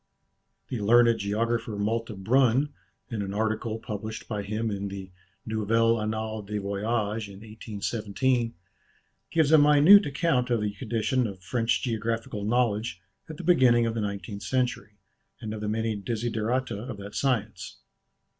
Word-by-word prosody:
The 125 - -3
learned 115 +2 +5
geographer 110 +2 -1
Malte 115 +2 -1
Brun, 130 +4 +3 0.4
in 110 -3 -2
an 100 0 -4
article 110 +1 -1
published 110 0 -6
by 105 -3 -3
him 110 +2 -2
in 100 0 -3
the 95 -1 -7 0.3
"Nouvelles 115 +1 +2
Annales 110 -1 -3
des 105 +1 -3
Voyages" 105 +2 -2
in 100 0 -12
1817, 110 +2 -2 0.7
gives 160 -3 +2
a 160 - +8
minute 150 +7 +7
account 135 -3 +1
of 120 -3 +1
the 105 -1 -1
condition 115 +3 0
of 95 -3 -9
French 115 +4 0
geographical 115 -2 -2
knowledge 110 -4 0 0.3
at 155 - -7
the 180 - -7
beginning 130 -9 +5
of 115 - -1
the 115 - -2
nineteenth 100 0 -4
century, 125 -4 -2 0.4
and 110 -2 -5
of 110 - -6
the 105 - -2
many 110 0 -1
desiderata 115 +2 -2
of 120 -1 -6
that 100 +1 -9
science. 110 -8 -2
110 Hz, 145 wpm, -27 LUFS, 105-120 Hz, 0.7 s, a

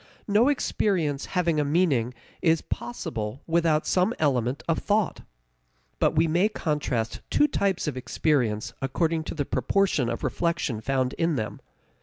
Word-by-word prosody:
No 215 +4 +4
experience 175 - 0
having 170 -3 +2
a - - +3
meaning 140 -6 +1 0.3
is 165 -2 +3
possible 120 0 -5
without 165 -2 +2
some 185 +6 +2
element 130 -3 0
of 165 - +1
thought. 210 -1 0 0.8
But - - +2
we 160 +2 +4
may 175 +6 +3
contrast 145 - -2
two 295 - +4
types 195 - 0
of 150 - -2
experience 125 -4 0
according 160 +4 0
to - - -5
the 145 -3 -1
proportion 135 0 +1
of 115 - -4
reflection 160 -9 -1
found 130 +1 0
in 165 -1 +2
them. 110 -4 -4
155 Hz, 145 wpm, -26 LUFS, 130-175 Hz, 0.8 s, No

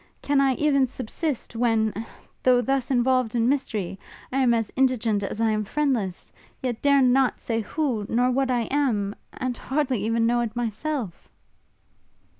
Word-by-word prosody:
Can 285 -1 +2
I 270 -2 +3
even 275 -2 +2
subsist, 255 +2 -4
when, 225 -2 +1 0.5
though 250 -1 +4
thus 265 0 0
involved 255 -2 +2
in 230 0 +2
mystery, 215 -9 -1 0.3
I 260 - -1
am 255 -3 +4
as 225 -3 0
indigent 240 -5 +2
as 200 +2 -4
I 225 -1 +2
am 215 0 0
friendless, 230 -7 -2 0.3
yet 245 -4 -3
dare 280 -1 +4
not 255 +1 +3
say 225 -1 -2
who, 235 -4 -2
nor 245 +2 +2
what 265 +1 +1
I 245 -2 +2
am, 230 -9 +1 0.2
and 255 -2 -3
hardly 265 -5 -1
even 230 +1 +1
know 240 +1 +2
it 230 -1 -3
myself!' 240 - -3
245 Hz, 160 wpm, -25 LUFS, 225-270 Hz, 0.5 s, though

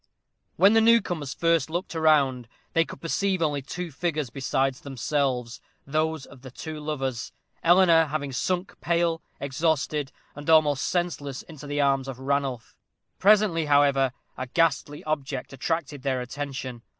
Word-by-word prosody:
When 195 +5 +6
the 225 - +5
newcomers 175 - +2
first 165 -3 +2
looked 175 +3 -3
round, 145 -7 +3 0.3
they 165 0 +3
could - - -11
perceive 190 +3 0
only 145 -3 0
two 175 +5 -6
figures 150 -3 -2
besides 135 0 -1
themselves 130 -3 -2 0.2
those 155 0 -1
of 135 -3 -15
the 130 - -9
two 155 +4 -7
lovers 135 -5 -3 0.3
Eleanor 170 -1 +6
having 145 -2 -3
sunk 180 +8 -2
pale, 170 -1 +1 0.2
exhausted, 150 0 -1 0.2
and 145 +2 -7
almost 150 -3 +4
senseless, 155 -7 -2
into 150 -3 -11
the 145 0 0
arms 135 -1 +2
of 135 -2 -6
Ranulph. 135 -3 -2 0.4
Presently, 200 -6 +4
however, 140 -2 +4 0.3
a 130 - -3
ghastly 145 0 0
object 140 -4 -3
attracted 145 0 -3
their 130 -1 0
attention. 130 -1 -5
145 Hz, 140 wpm, -26 LUFS, 135-165 Hz, 0.4 s, When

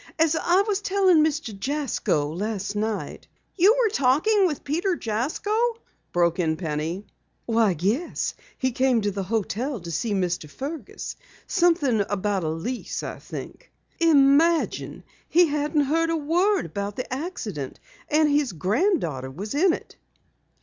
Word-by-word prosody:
As 325 -1 +3
I 355 +4 +3
was 410 -1 -1
telling 380 -5 +4
Mr. 305 -7 -1
Jasko 195 - -1
last 205 +1 -3
night 215 0 -3 0.2
" - - -46
"You 395 +5 +5
were 450 -5 +2
talking 370 +9 +3
with 300 -5 -4
Peter 345 +6 0
Jasko?" 405 - -1 0.4
broke 170 0 +2
in 160 -2 +1
Penny. 160 +4 -3 0.4
"Yes, 225 - +1 0.2
he 260 -1 0
came 255 -1 +2
to 205 0 0
the 200 0 -3
hotel 225 +6 -2
to 170 -1 -7
see 205 +7 -1
Mr. 175 -5 -1
Fergus 285 - -6 0.3
something 330 - +2
about 200 -1 -1
a 155 - -1
lease, 165 +11 -4
I - - -6
think. - - -9 0.3
Imagine! 320 +1 +3 0.3
He 355 +1 +6
hadn't 295 0 0
heard 325 +4 +1
a 330 - +1
word 355 +7 +1
about 200 +5 -4
the 255 - -4
accident, 220 - -5 0.3
and 305 +1 +4
his 290 -6 +1
granddaughter 180 - 0
was 195 +11 -6
in 345 +6 +4
it!" - - -6
265 Hz, 145 wpm, -25 LUFS, 200-330 Hz, 0.4 s, He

